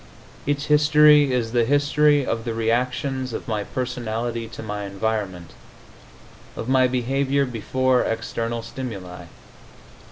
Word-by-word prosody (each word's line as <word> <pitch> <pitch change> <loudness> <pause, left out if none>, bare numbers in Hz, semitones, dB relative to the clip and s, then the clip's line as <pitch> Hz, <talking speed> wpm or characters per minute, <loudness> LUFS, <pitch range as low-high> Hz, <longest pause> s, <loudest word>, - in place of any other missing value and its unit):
Its 145 0 0
history 150 -1 +5
is 120 -3 -1
the 120 -1 +2
history 145 +2 +3
of 115 -2 -2
the 115 -1 -3
reactions 125 +3 -1
of - - -6
my 105 -2 -1
personality 120 -1 -3
to 110 - -9
my 105 -1 -4
environment, 100 -4 -3 1.0
of 115 - -6
my 130 -1 +4
behavior 135 +3 0
before 130 +2 0
external 115 +1 -3
stimuli. 100 -8 -7
120 Hz, 120 wpm, -23 LUFS, 115-135 Hz, 1.0 s, history